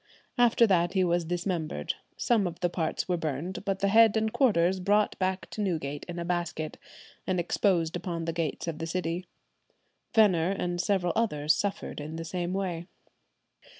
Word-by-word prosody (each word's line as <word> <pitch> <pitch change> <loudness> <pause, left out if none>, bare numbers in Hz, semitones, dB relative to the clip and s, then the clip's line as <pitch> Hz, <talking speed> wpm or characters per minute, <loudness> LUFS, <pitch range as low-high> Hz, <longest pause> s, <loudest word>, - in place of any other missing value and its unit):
After 235 -1 +5
that 175 -4 +2
he 190 -2 +3
was 175 -1 +1
dismembered; 170 - -2 0.2
some 220 -6 +2
of 170 0 -7
the 175 -1 +1
parts 160 -3 -2
were 180 -1 +1
burnt, 160 +4 -3
but 195 -1 -1
the 200 - +3
head 225 +1 +6
and 220 0 0
quarters 190 -8 +3
brought 205 +3 +2
back 185 0 -1
to 215 - -4
Newgate 155 -7 -2
in 175 - -5
a 170 - -3
basket, 170 -3 -3 0.5
and 185 -2 +1
exposed 175 -1 +1
upon 170 -1 -3
the 165 - -2
gates 165 -1 -2
of 160 -2 -3
the 165 - -3
city. 175 +1 -2 0.9
Venner 185 -6 +5
and 175 0 -1
several 180 -3 +1
others 150 -10 +2
suffered 200 -4 -3
in 155 +2 -6
the 165 0 -5
same 175 +1 -3
way. 180 -3 -3
175 Hz, 175 wpm, -28 LUFS, 165-195 Hz, 0.9 s, head